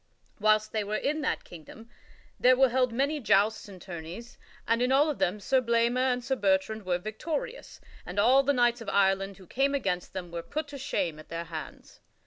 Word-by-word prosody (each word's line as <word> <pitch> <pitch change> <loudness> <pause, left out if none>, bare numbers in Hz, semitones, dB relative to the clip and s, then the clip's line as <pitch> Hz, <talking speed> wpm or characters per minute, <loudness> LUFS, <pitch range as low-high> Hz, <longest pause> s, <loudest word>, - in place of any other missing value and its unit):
Whilst 215 0 +3
they 215 -1 -1
were 210 +1 -3
in 300 +7 -1
that - - -1
kingdom 175 +7 -12 0.5
there 255 +1 +6
were 265 0 +5
held 250 0 +1
many 280 +6 0
jousts 215 -3 +2
and 190 -2 -11
tourneys, 180 +7 -9 0.3
and 230 +1 +2
in 250 +1 +2
all 290 +3 +4
of 290 - -7
them 185 +4 0
Sir 260 +6 +2
Blamor 235 +2 +2
and 250 0 -2
Sir 265 - 0
Bertrand 195 -1 0
were 175 -1 +2
victorious, 320 - -5 0.2
and 180 - -8
all 250 +6 +5
the 275 +1 +1
knights 240 -2 +2
of 230 - -5
Ireland 195 -1 +1
who 190 - -15
came 275 +8 0
against 195 -9 -2
them 180 -2 -6
were 170 0 -4
put 295 - -4
to 280 -1 -8
shame 175 - -2
at 155 - -14
their 165 +1 -4
hands. 160 -2 -9
225 Hz, 205 wpm, -28 LUFS, 190-260 Hz, 0.5 s, there